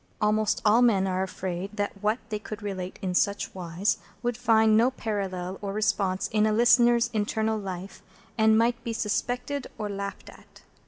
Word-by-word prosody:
Almost 215 0 +1
all 220 +3 +5
men 210 -6 +4
are 185 -1 -1
afraid 190 +2 -4
that 205 -1 -3
what 215 +2 +1
they 210 -2 -3
could 215 0 -8
relate 185 -2 -5
in 185 -1 -1
such 200 +2 0
wise 180 +2 -1 0.2
would 240 0 0
find 220 -2 +4
no 235 +3 +5
parallel 195 -6 -4
or 200 -1 -4
response 195 -3 0
in 215 0 +2
a - - +2
listener's 240 +1 +4
internal 220 +1 0
life, 190 -1 -7 0.3
and 220 -1 +4
might 235 +1 +1
be 235 - -3
suspected 245 +5 -2
or 210 -1 -3
laughed 200 0 -6
at. - - -19
210 Hz, 170 wpm, -27 LUFS, 195-225 Hz, 0.3 s, all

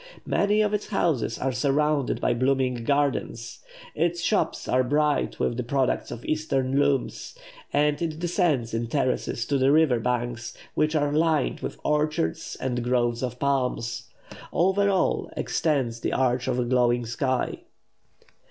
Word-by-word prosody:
Many 210 +1 +2
of 210 0 0
its 210 - -1
houses 160 - 0
are 135 - -1
surrounded 140 +2 +1
by - - +1
blooming 130 -1 0
gardens; 140 -4 -1 0.3
its 170 0 0
shops 215 - 0
are 130 0 +3
bright 150 +3 +1
with 120 - 0
the 125 - -1
products 130 +1 0
of 120 - -8
Eastern 135 -3 0
looms; 140 - 0 0.4
and 150 +1 +1
it 160 -2 -2
descends 165 - 0
in 115 +1 -1
terraces 125 -2 -1
to 140 -1 0
the 135 +1 +4
river 150 -6 +4
banks, 120 0 -3 0.2
which 155 +1 +1
are 145 -1 +1
lined 155 -2 +1
with - - -6
orchards 150 - -1
and 125 -2 -2
groves 120 -1 +1
of 125 -1 -3
palm. 135 -2 0 0.7
Over 190 +3 +2
all 190 -2 +1
extends 135 -8 0
the - - -2
arch 125 -1 +1
of 125 -1 0
a 125 - 0
glowing 120 -1 +2
sky. 130 +2 -1
135 Hz, 150 wpm, -25 LUFS, 125-155 Hz, 0.7 s, the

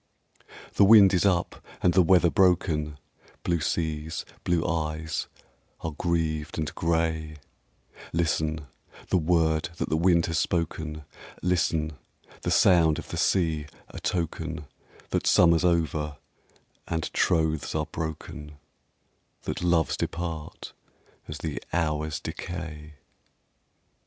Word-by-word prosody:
The - - +5
wind 100 -2 +8
is 95 +2 +3
up, 90 -3 0 0.2
and 90 - +4
the 95 - +6
weather 90 -1 +4
broken, 80 -5 +2 0.5
Blue 85 -1 +1
seas, 80 0 -2 0.2
blue 85 -1 +1
eyes, 80 -1 -2 0.5
are 80 - -3
grieved 80 -1 -1
and 75 -2 -2
grey, 80 -1 -1 0.8
Listen, 80 -2 0 0.5
the 95 - +4
word 80 -1 +2
that - - -2
the - - +1
wind 85 0 +4
has 80 -1 0
spoken, 80 -3 -2 0.4
Listen, 80 -4 0 0.4
the - - -2
sound 80 -4 +5
of - - -7
the - - -4
sea,—a 80 -5 -1
token 80 -2 -3 0.5
That - - 0
summer's 85 0 +5
over, 80 -4 0 0.7
and 80 -1 -3
troths 80 -3 +1
are 75 -1 0
broken,— 80 -1 -6 0.9
That - - -4
loves 85 -2 +2
depart 85 -3 -5 0.5
as 75 - -6
the 75 -1 -4
hours 75 -2 -1
decay. 80 -2 -7
80 Hz, 110 wpm, -27 LUFS, 75-85 Hz, 0.9 s, wind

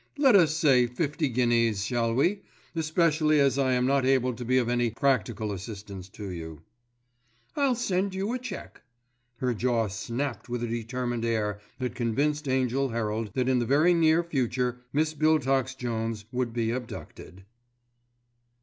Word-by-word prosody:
Let 270 -6 +5
us 160 -5 +4
say 130 -6 +4
fifty 145 +4 -1
guineas, 115 -4 +2
shall 115 0 0
we, 185 +10 +2 0.3
especially 155 -1 +2
as 140 -1 +3
I 130 -2 +2
am 125 0 +2
not 135 0 +2
able 130 -1 +2
to 125 - -7
be 130 +2 +2
of 125 -2 +2
any 120 -1 +1
practical 115 -4 0
assistance 100 -1 -7
to 100 0 -7
you." 80 -3 -8 0.9
"I'll 275 -4 +2
send 195 -4 -1
you 195 +5 -2
a 255 - -2
cheque." 235 -6 -8 0.6
Her 125 0 0
jaw 115 -2 0
snapped 120 +3 -4
with 120 0 -3
a - - -1
determined 120 +1 -3
air 105 -3 -1 0.2
that 130 -1 -3
convinced 145 +5 -1
Angell 130 +1 +1
Herald 110 -1 -2
that 130 -1 +1
in 130 -1 +3
the 120 - 0
very 155 +6 +4
near 165 0 +4
future 125 -5 -1
Miss 155 +2 +1
Biltox 135 -4 +1
Jones 115 -3 -3
would 125 -1 -1
be 115 -1 -1
abducted. 110 -6 -8
125 Hz, 160 wpm, -27 LUFS, 115-150 Hz, 0.9 s, Let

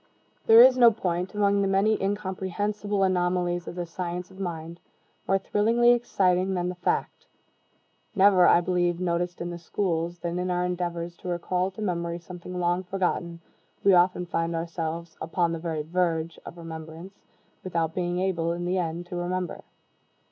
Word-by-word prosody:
There 225 +1 +10
is 255 0 +6
no 240 -1 +9
point, 185 -3 -3
among 200 -1 +2
the 195 - +1
many 195 +3 +2
incomprehensible 205 +1 -2
anomalies 180 -1 0
of - - -6
the 175 -1 -3
science 175 +1 -5
of 190 - -14
mind, 170 -2 -5 0.5
more 195 - +3
thrillingly 230 +5 +3
exciting 190 -6 +1
than 180 0 -1
the - - -3
fact 180 0 -2 0.9
never, 190 -2 +6
I 170 - +6
believe, 175 -1 0
noticed 175 0 -2
in 175 0 -3
the 175 - -7
schools 170 -1 -2
than 170 +1 -3
in 180 0 -2
our 180 0 0
endeavors 175 -1 -3
to - - -10
recall 180 +1 -1
to 200 +3 -7
memory 170 -3 -2
something 180 +1 -8
long 175 +1 +1
forgotten, 180 -2 -2 0.4
we 195 - +6
often 180 0 +3
find 165 0 -2
ourselves 165 0 -4
upon 170 +1 0
the 165 - -3
very 160 -2 -3
verge 165 0 -1
of 175 - -9
remembrance, 165 +2 -9 0.5
without 165 -3 -1
being 175 0 -1
able, 170 -3 0
in 175 +1 -4
the 185 +1 0
end, 170 0 -3
to 175 - -7
remember. 180 0 -3
180 Hz, 165 wpm, -26 LUFS, 170-190 Hz, 0.9 s, There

